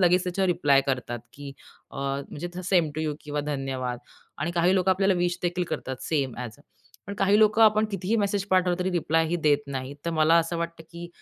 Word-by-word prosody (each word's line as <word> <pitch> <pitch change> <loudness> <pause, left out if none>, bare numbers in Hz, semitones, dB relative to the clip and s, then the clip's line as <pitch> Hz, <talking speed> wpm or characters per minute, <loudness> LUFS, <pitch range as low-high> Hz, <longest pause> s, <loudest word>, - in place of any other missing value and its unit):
लगेच 180 0 +4
त्याच्यावर 190 +1 0
रिप्लाय 145 -6 +4
करतात 125 -3 -2
की 140 -1 -9 0.4
अ, - - -11
म्हणजे 140 +6 -4
सेम 175 -5 +2
टू 155 - -3
यू 155 -2 -1
किंवा 150 0 -3
धन्यवाद 135 -4 -3 0.4
आणि 155 +4 -1
काही 175 +2 +2
लोक 190 0 +1
आपल्याला 195 +1 +3
विश 175 0 0
देखील 175 0 0
करतात 130 0 -4
सेम 140 -6 -1
ॲज 120 -4 -7 0.5
पण 200 - -5
काही 200 +1 +3
लोक 215 0 +4
आपण 215 -1 +5
कितीही 195 +2 -2
मेसेज 200 -2 0
पाठवलं 185 -1 +3
तरी 180 +1 -1
रिप्लायही 165 -1 +1
देत 145 -2 +4
नाहीत. 135 0 -5
तर 170 - -1
मला 155 0 +3
असं 165 +1 -1
वाटतं, 170 -1 -4
की 170 0 -8
170 Hz, 200 wpm, -26 LUFS, 145-185 Hz, 0.5 s, आपण